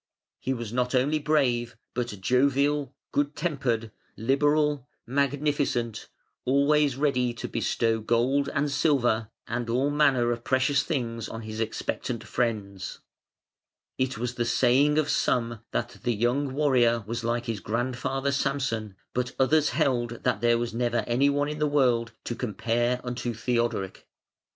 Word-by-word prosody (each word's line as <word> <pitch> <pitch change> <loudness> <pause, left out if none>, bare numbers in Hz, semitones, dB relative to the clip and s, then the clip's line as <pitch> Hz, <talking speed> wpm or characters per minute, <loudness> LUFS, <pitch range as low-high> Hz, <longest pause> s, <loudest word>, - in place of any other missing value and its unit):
He 130 - -2
was 120 -4 -4
not 125 +1 0
only 145 +5 +2
brave 125 -6 +1 0.2
but 120 -1 -1
jovial, 140 +6 +2 0.2
good 145 0 0
tempered, 130 -9 -1 0.3
liberal, 145 +2 +2 0.2
magnificent, 140 -3 0 0.3
always 140 +1 +3
ready 125 -4 +1
to - - -5
bestow 115 -1 0
gold 120 +6 +1
and 145 +1 0
silver 125 -7 +2 0.2
and 120 +1 -3
all 130 +5 +1
manner 135 -5 +3
of 120 0 -3
precious 135 +2 +2
things 115 -8 -3
on 115 0 -6
his 110 0 -6
expectant 115 +1 -3
friends. 105 -6 -3 1.0
It 130 -1 0
was 120 +1 -2
the 120 - -1
saying 130 +5 +3
of 155 -2 +2
some 120 -2 0
that 120 +1 -3
the 120 -2 0
young 125 +6 +1
warrior 125 -5 +3
was 115 +2 -4
like 120 +1 -1
his 115 -3 -3
grandfather, 130 +5 -1
Samson; 130 -7 -1 0.2
but 125 0 -2
others 150 +3 +3
held 120 -3 0
that - - +1
there 120 0 +4
was 120 -1 -3
never 120 -1 0
any 130 +4 +3
one 145 0 +1
in 150 0 -4
the 150 - +2
world 125 -5 +2
to - - -3
compare 120 +2 0
unto 125 -1 -3
Theodoric. 115 -5 -1
125 Hz, 145 wpm, -27 LUFS, 115-140 Hz, 1.0 s, there